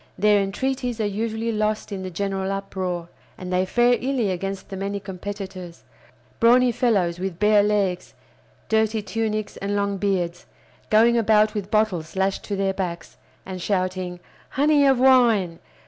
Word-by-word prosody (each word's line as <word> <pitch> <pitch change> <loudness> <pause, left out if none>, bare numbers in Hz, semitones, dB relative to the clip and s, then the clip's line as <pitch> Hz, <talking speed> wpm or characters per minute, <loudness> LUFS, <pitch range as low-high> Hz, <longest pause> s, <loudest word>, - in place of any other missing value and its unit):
Their 210 +1 +4
entreaties 245 +4 -2
are 215 - +1
usually 220 +2 -2
lost 215 0 -1
in 195 -2 -4
the 185 - -5
general 195 +1 -2
uproar, 185 -3 -4 0.3
and 185 0 -6
they 185 +1 +1
fare 240 +4 +3
illy 250 -6 0
against 195 +1 -4
the 195 - -6
many 200 +1 -3
competitors: 190 -2 -7 0.6
brawny 245 +2 +5
fellows 195 -8 +1
with 185 -2 -4
bare 210 +1 +4
legs, 200 -3 -1 0.5
dirty 220 -1 +1
tunics, 215 +1 -3
and 200 +1 -3
long 200 -1 0
beards, 180 -3 -2 0.4
going 230 +2 +5
about 215 -1 +3
with 205 -2 -4
bottles 195 -8 0
lashed 190 0 0
to 205 - -3
their 195 0 0
backs, 180 -3 -5 0.3
and 185 -1 -6
shouting 185 -2 -2 0.3
"Honey 290 0 +3
of 265 -2 +3
wine! 235 -10 +4
200 Hz, 150 wpm, -23 LUFS, 185-220 Hz, 0.6 s, brawny